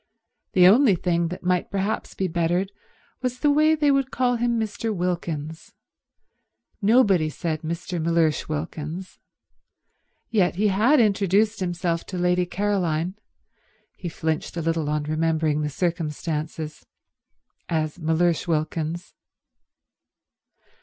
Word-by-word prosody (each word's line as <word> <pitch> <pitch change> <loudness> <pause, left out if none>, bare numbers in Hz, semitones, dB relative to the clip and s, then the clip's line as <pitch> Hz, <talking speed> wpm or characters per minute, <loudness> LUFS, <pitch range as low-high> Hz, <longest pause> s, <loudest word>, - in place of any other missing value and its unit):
The 180 -1 +7
only 220 +1 +6
thing 170 -1 0
that 180 +2 -7
might 180 -1 +1
perhaps 200 +2 -2
be 190 - -1
bettered 175 +3 0 0.5
was 250 -1 -2
the 290 +3 +3
way 310 +2 +4
they 295 -2 +3
would 275 -1 +1
call 250 -1 +1
him 235 0 +1
Mr. 220 +1 -2
Wilkins. 170 -4 -3 1.1
Nobody 200 -7 +4
said 155 0 -3
Mr. 170 +1 -4
Mellersh 165 -2 +1
Wilkins. 155 +3 -5 1.1
Yet 195 -7 +2
he 210 +3 +2
had 225 +10 +4
introduced 210 0 +2
himself 175 -2 -1
to 185 - -5
Lady 180 0 +1
Caroline—he 185 -1 -4
flinched 160 +1 -3
a 170 - -2
little 165 -2 0
on 150 0 0
remembering 155 0 0
the 150 - -1
circumstances—as 155 0 -5
Mellersh 165 +1 +1
Wilkins. 160 +1 -2
175 Hz, 110 wpm, -24 LUFS, 160-200 Hz, 1.1 s, The